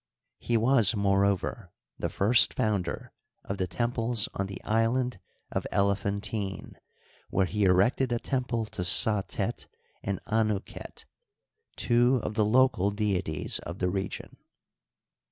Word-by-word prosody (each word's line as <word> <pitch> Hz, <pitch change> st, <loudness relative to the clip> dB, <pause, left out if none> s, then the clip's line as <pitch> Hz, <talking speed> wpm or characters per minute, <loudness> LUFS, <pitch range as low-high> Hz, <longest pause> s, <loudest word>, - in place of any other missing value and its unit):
He 120 Hz, -, 0 dB
was, 115 Hz, -2 st, +4 dB
moreover, 100 Hz, -1 st, 0 dB, 0.3 s
the -, -, -1 dB
nrst 115 Hz, +5 st, +3 dB
founder 100 Hz, -5 st, -2 dB, 0.3 s
of 100 Hz, -, -5 dB
the 95 Hz, -, 0 dB
temples 115 Hz, +4 st, -1 dB
on 95 Hz, -, -2 dB
the 100 Hz, -, -8 dB
Island 115 Hz, +1 st, 0 dB, 0.3 s
of -, -, -2 dB
Elephantine, 100 Hz, 0 st, -2 dB, 0.5 s
where 95 Hz, -, +1 dB
he 105 Hz, +2 st, 0 dB
erected 100 Hz, +8 st, +3 dB
a 120 Hz, -, +1 dB
temple 125 Hz, -3 st, -2 dB
to 105 Hz, -, -7 dB
Satet 100 Hz, +2 st, +2 dB, 0.3 s
and 100 Hz, -1 st, -3 dB
Anu 110 Hz, -2 st, +1 dB
ket, -, -, -11 dB, 0.7 s
two 120 Hz, +1 st, +2 dB
of -, -, -3 dB
the 105 Hz, 0 st, +2 dB
local 120 Hz, -3 st, +3 dB
deities 100 Hz, -7 st, -1 dB
of 85 Hz, -, -7 dB
the 90 Hz, -1 st, -1 dB
region. 95 Hz, 0 st, -5 dB
105 Hz, 125 wpm, -28 LUFS, 95-115 Hz, 0.7 s, was